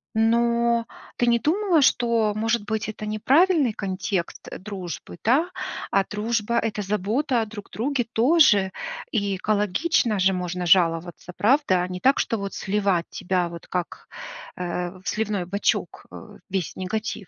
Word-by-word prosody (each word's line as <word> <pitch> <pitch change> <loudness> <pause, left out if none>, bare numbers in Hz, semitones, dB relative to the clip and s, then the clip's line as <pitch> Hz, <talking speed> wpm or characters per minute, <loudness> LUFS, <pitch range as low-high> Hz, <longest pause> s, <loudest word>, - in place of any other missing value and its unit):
Но 235 +1 +2 0.3
ты 240 - 0
не 235 0 +4
думала, 335 - +2
что 230 -4 +2
может 225 0 0
быть 215 0 -2
это 215 0 -6
неправильный 275 - +3
контекст, 190 -2 -3
э, - - -6
дружбы, 185 -4 -7
да, 300 - +2 0.4
а 195 - +3
дружба- 230 +2 -1
это 215 -2 -2
забота 215 +6 0
о - - -1
друг 210 -2 -10
друге 245 0 -1
тоже. 230 - +4 0.4
И 200 -4 0
экологично 210 - +1
же 190 +1 +3
можно 180 0 -3
жаловаться, 170 0 +2
правда? 210 -6 +3
А - - -3
не 180 0 -6
так, 270 +5 +4
что 225 - 0
вот 200 0 -5
сливать 195 -4 0
тебя 180 -1 -1
вот, 170 0 -10
как, 180 -2 -4 0.5
э, 180 0 -3
в - - -22
сливной 210 -4 -1
бачок, 200 +3 -1
э, - - -12
весь 190 -4 -2
негатив. 200 0 -4
210 Hz, 150 wpm, -24 LUFS, 185-235 Hz, 0.5 s, не